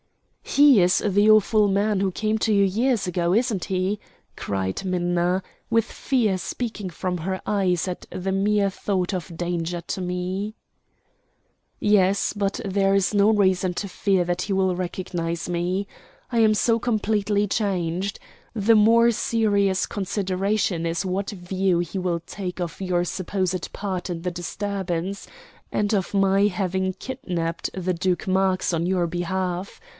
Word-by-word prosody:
"He 280 Hz, -7 st, +5 dB
is 180 Hz, +1 st, +4 dB
the 205 Hz, +2 st, +4 dB
awful 215 Hz, -1 st, +5 dB
man 200 Hz, 0 st, +1 dB
who 195 Hz, -1 st, +1 dB
came 215 Hz, +3 st, 0 dB
to 220 Hz, -, +1 dB
you 200 Hz, -1 st, +4 dB
years 220 Hz, +1 st, +1 dB
ago, 175 Hz, 0 st, 0 dB
isn't 225 Hz, -4 st, +1 dB
he?" 190 Hz, +2 st, -1 dB, 0.4 s
cried 95 Hz, -, -3 dB
Minna, 180 Hz, 0 st, 0 dB, 0.3 s
with 230 Hz, -1 st, +3 dB
fear 235 Hz, -7 st, 0 dB
speaking 215 Hz, 0 st, -4 dB
from 180 Hz, +1 st, -3 dB
her 185 Hz, +3 st, -3 dB
eyes 190 Hz, -4 st, +1 dB
at 180 Hz, -, -5 dB
the 185 Hz, +1 st, -3 dB
mere 200 Hz, +1 st, +2 dB
thought 190 Hz, -1 st, -2 dB
of 170 Hz, -2 st, -5 dB
danger 175 Hz, 0 st, -2 dB
to 175 Hz, +2 st, -5 dB
me. 185 Hz, +4 st, -3 dB, 1.2 s
"Yes 200 Hz, -2 st, +3 dB
but 200 Hz, -1 st, -1 dB
there 195 Hz, 0 st, +2 dB
is 195 Hz, +1 st, +2 dB
no 205 Hz, +1 st, +4 dB
reason 190 Hz, -4 st, +2 dB
to 200 Hz, -, -3 dB
fear 190 Hz, -1 st, +1 dB
that 175 Hz, +1 st, -1 dB
he 205 Hz, -, -2 dB
will 190 Hz, -1 st, +2 dB
recognize 175 Hz, -2 st, -3 dB
me. 180 Hz, +3 st, -1 dB, 0.4 s
I 235 Hz, -, +1 dB
am 220 Hz, -1 st, +5 dB
so 230 Hz, +2 st, +2 dB
completely 210 Hz, -3 st, +1 dB
changed. 190 Hz, -2 st, -1 dB, 0.4 s
The 225 Hz, +1 st, +4 dB
more 230 Hz, +2 st, +5 dB
serious 205 Hz, -4 st, +1 dB
consideration 195 Hz, -2 st, -1 dB
is 165 Hz, +3 st, -1 dB
what 190 Hz, +2 st, -2 dB
view 185 Hz, -2 st, 0 dB
he 175 Hz, +2 st, -3 dB
will 180 Hz, -2 st, -1 dB
take 180 Hz, +1 st, -6 dB
of 175 Hz, +1 st, -4 dB
your 180 Hz, -2 st, 0 dB
supposed 185 Hz, 0 st, -2 dB
part 190 Hz, -3 st, -4 dB
in 170 Hz, -1 st, -4 dB
the 180 Hz, -, -1 dB
disturbance, 190 Hz, +1 st, -3 dB, 0.4 s
and 210 Hz, +1 st, 0 dB
of 195 Hz, -2 st, -1 dB
my 195 Hz, 0 st, +4 dB
having 190 Hz, -1 st, -1 dB
kidnapped 180 Hz, -7 st, -4 dB
the 185 Hz, -1 st, -1 dB
Duke 180 Hz, +1 st, -1 dB
Marx 190 Hz, -1 st, +1 dB
on 165 Hz, 0 st, 0 dB
your 180 Hz, -2 st, +1 dB
behalf. 180 Hz, +2 st, -3 dB
190 Hz, 150 wpm, -24 LUFS, 180-205 Hz, 1.2 s, He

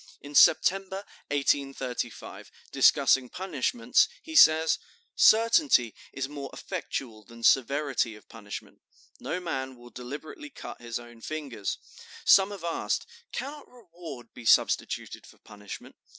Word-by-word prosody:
In 145 Hz, +1 st, -11 dB
September, 195 Hz, +6 st, +4 dB, 0.2 s
1835, 135 Hz, -4 st, -2 dB, 0.2 s
discussing 130 Hz, -2 st, +4 dB
punishments, 195 Hz, -, +1 dB, 0.2 s
he 320 Hz, -, -9 dB
says: 160 Hz, -, +6 dB, 0.4 s
"Certainty 230 Hz, -, +5 dB, 0.2 s
is 135 Hz, -1 st, -3 dB
more 140 Hz, -1 st, -7 dB
effectual 110 Hz, -5 st, -5 dB
than 115 Hz, +2 st, -14 dB
severity 135 Hz, -3 st, +2 dB
of 105 Hz, -, -17 dB
punishment. 105 Hz, -3 st, -10 dB, 0.4 s
No 180 Hz, -, -3 dB
man 135 Hz, -7 st, -4 dB
will 120 Hz, 0 st, -15 dB
deliberately 145 Hz, -, -8 dB
cut 275 Hz, -, -10 dB
his 120 Hz, -1 st, -4 dB
own 120 Hz, -1 st, -13 dB
fingers. 135 Hz, -10 st, -4 dB, 0.5 s
Some 195 Hz, 0 st, +6 dB
have 200 Hz, -4 st, -8 dB
asked, 170 Hz, -1 st, -2 dB, 0.3 s
'Cannot 285 Hz, +3 st, -6 dB
reward 170 Hz, -, -11 dB
be 120 Hz, -, -11 dB
substituted 115 Hz, -, +1 dB
for -, -, -18 dB
punishment? 105 Hz, -1 st, -11 dB
140 Hz, 120 wpm, -28 LUFS, 120-185 Hz, 0.5 s, says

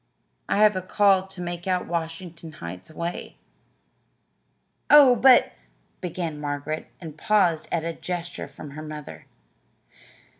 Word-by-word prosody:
I -, -, +1 dB
have 210 Hz, -1 st, +5 dB
a 185 Hz, -, -1 dB
call 190 Hz, 0 st, +3 dB
to 190 Hz, -1 st, -9 dB
make 175 Hz, 0 st, -5 dB
out 180 Hz, -1 st, 0 dB
Washington 165 Hz, -1 st, -5 dB
Heights 90 Hz, -, -9 dB
way." 170 Hz, +2 st, -6 dB, 1.5 s
"Oh, 285 Hz, -4 st, +8 dB
but 250 Hz, +1 st, +5 dB, 0.2 s
" -, -, -41 dB
began 165 Hz, -4 st, -4 dB
Margaret, 145 Hz, +1 st, -4 dB
and 155 Hz, -3 st, -10 dB
paused 185 Hz, -7 st, +2 dB
at 165 Hz, -2 st, 0 dB
a 165 Hz, 0 st, -3 dB
gesture 175 Hz, 0 st, -5 dB
from 145 Hz, -, -11 dB
her 150 Hz, +2 st, -8 dB
mother. 150 Hz, -1 st, -9 dB
170 Hz, 135 wpm, -25 LUFS, 155-190 Hz, 1.5 s, Oh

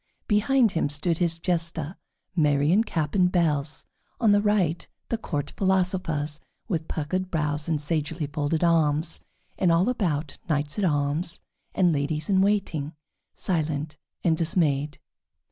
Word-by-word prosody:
Behind 225 Hz, +2 st, +3 dB
him 160 Hz, -4 st, 0 dB
stood 155 Hz, +3 st, -1 dB
his 170 Hz, -2 st, +1 dB
Jester, 165 Hz, -1 st, -2 dB, 0.4 s
merry 145 Hz, -2 st, +3 dB
in 210 Hz, +5 st, +4 dB
cap 155 Hz, -9 st, -2 dB
and 180 Hz, -2 st, +3 dB
bells; 150 Hz, -5 st, 0 dB, 0.3 s
on 225 Hz, -3 st, +4 dB
the 205 Hz, 0 st, +5 dB
right, 195 Hz, -6 st, +1 dB, 0.2 s
the 230 Hz, -, 0 dB
court 145 Hz, -8 st, -3 dB
philosophers, 180 Hz, -6 st, 0 dB, 0.3 s
with 165 Hz, -7 st, -2 dB
puckered 185 Hz, +4 st, -2 dB
brows 150 Hz, -2 st, -1 dB
and 155 Hz, -2 st, +1 dB
sagely 150 Hz, +1 st, -2 dB
folded 150 Hz, +2 st, -1 dB
arms; 160 Hz, -1 st, +2 dB, 0.4 s
and 180 Hz, -3 st, +4 dB
all 170 Hz, +6 st, +3 dB
about 170 Hz, -11 st, -1 dB
knights 145 Hz, +3 st, 0 dB
at 200 Hz, -, +2 dB
arms 150 Hz, +2 st, 0 dB, 0.4 s
and 180 Hz, -3 st, +4 dB
ladies 150 Hz, +4 st, -1 dB
in 190 Hz, -1 st, +4 dB
waiting 185 Hz, -7 st, 0 dB, 0.4 s
silent 155 Hz, -3 st, -2 dB, 0.3 s
and 165 Hz, -3 st, +3 dB
dismayed. 150 Hz, -4 st, +1 dB
165 Hz, 140 wpm, -26 LUFS, 150-185 Hz, 0.4 s, the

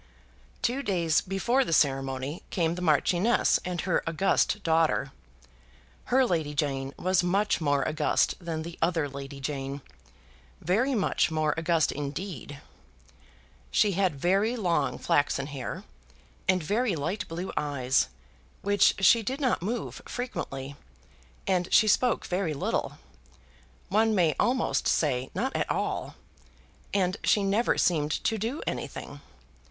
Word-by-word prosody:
Two 255 Hz, +4 st, +1 dB
days 170 Hz, -, +1 dB
before 235 Hz, +8 st, +1 dB
the 245 Hz, -, -5 dB
ceremony 135 Hz, 0 st, 0 dB
came 165 Hz, -2 st, 0 dB
the 180 Hz, -, -6 dB
Marchioness 180 Hz, +7 st, +3 dB
and 180 Hz, -2 st, -3 dB
her 180 Hz, -3 st, +1 dB
august 195 Hz, +4 st, +1 dB
daughter. 160 Hz, -4 st, +2 dB, 0.9 s
Her 260 Hz, +1 st, +3 dB
Lady 160 Hz, -8 st, -1 dB
Jane 135 Hz, -3 st, -1 dB
was 185 Hz, 0 st, +2 dB
much 195 Hz, +2 st, +1 dB
more 145 Hz, -2 st, +1 dB
august 155 Hz, -1 st, +1 dB
than 160 Hz, -2 st, -3 dB
the 170 Hz, +1 st, -9 dB
other 165 Hz, -3 st, +1 dB
Lady 140 Hz, 0 st, -8 dB
Jane; 135 Hz, 0 st, -4 dB, 0.8 s
very 235 Hz, -, +1 dB
much 200 Hz, -4 st, +1 dB
more 155 Hz, -1 st, +1 dB
august 165 Hz, -1 st, +1 dB
indeed. 145 Hz, -, -6 dB, 1.1 s
She 205 Hz, -, +3 dB
had 185 Hz, -4 st, +1 dB
very 195 Hz, -, +2 dB
long 170 Hz, -, 0 dB
flaxen 145 Hz, -1 st, +1 dB
hair, 140 Hz, -2 st, -6 dB, 0.7 s
and 185 Hz, -3 st, +3 dB
very 210 Hz, +4 st, 0 dB
light 165 Hz, +8 st, -3 dB
blue 170 Hz, +3 st, -5 dB
eyes, 135 Hz, -, +1 dB, 0.6 s
which 205 Hz, -1 st, +4 dB
she 230 Hz, +5 st, +6 dB
did 260 Hz, +6 st, -3 dB
not 260 Hz, -, +1 dB
move 225 Hz, +6 st, -4 dB
frequently, 140 Hz, -, -5 dB, 0.7 s
and 180 Hz, -2 st, 0 dB
she 215 Hz, -, +6 dB
spoke 245 Hz, +4 st, +2 dB
very 180 Hz, -4 st, -1 dB
little, 140 Hz, -, -2 dB, 0.9 s
one 220 Hz, +1 st, +3 dB
may 170 Hz, -5 st, +3 dB
almost 255 Hz, +2 st, +1 dB
say 130 Hz, -4 st, +1 dB
not 265 Hz, +2 st, -1 dB
at -, -, -1 dB
all, -, -, -2 dB, 0.8 s
and 185 Hz, 0 st, +1 dB
she 205 Hz, -, +3 dB
never 200 Hz, +5 st, +1 dB
seemed 155 Hz, -4 st, +2 dB
to 220 Hz, -1 st, 0 dB
do 235 Hz, +9 st, -3 dB
anything. -, -, -5 dB
175 Hz, 130 wpm, -28 LUFS, 145-205 Hz, 1.1 s, she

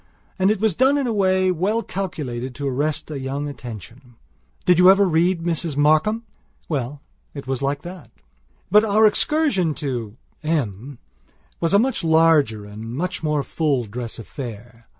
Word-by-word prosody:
And 190 Hz, +1 st, +4 dB
it 215 Hz, -1 st, +1 dB
was 220 Hz, -2 st, +2 dB
done 265 Hz, -, +3 dB
in 280 Hz, -, 0 dB
a 235 Hz, -, -1 dB
way 185 Hz, -2 st, +2 dB
well 200 Hz, +7 st, 0 dB
calculated 135 Hz, -10 st, -5 dB
to 140 Hz, -1 st, -3 dB
arrest 150 Hz, +4 st, -2 dB
a 145 Hz, -, -4 dB
young 135 Hz, +2 st, -3 dB
attention. 120 Hz, -1 st, -10 dB, 0.5 s
Did 180 Hz, -1 st, +4 dB
you 180 Hz, +1 st, +8 dB
ever 195 Hz, +1 st, +5 dB
read 170 Hz, +1 st, +1 dB
Mrs 165 Hz, -3 st, -2 dB
Markham? 155 Hz, +10 st, +3 dB, 0.4 s
Well, 140 Hz, -1 st, -3 dB, 0.3 s
it 140 Hz, -, -7 dB
was 135 Hz, 0 st, -3 dB
like 140 Hz, +1 st, -1 dB
that.... 175 Hz, -9 st, -9 dB, 0.6 s
But 210 Hz, +2 st, +6 dB
our 215 Hz, 0 st, +4 dB
excursion 210 Hz, -, +1 dB
to 120 Hz, -6 st, -4 dB, 0.2 s
M 140 Hz, -, -2 dB, 0.6 s
was 165 Hz, -, 0 dB
a 200 Hz, -, +6 dB
much 250 Hz, -1 st, +1 dB
larger, 160 Hz, -10 st, +3 dB
a 105 Hz, 0 st, -11 dB
much 125 Hz, +12 st, -4 dB
more 150 Hz, -3 st, 0 dB
full 140 Hz, -7 st, 0 dB
dress 115 Hz, +2 st, -6 dB
affair. 115 Hz, -1 st, -9 dB
155 Hz, 160 wpm, -22 LUFS, 130-185 Hz, 0.6 s, you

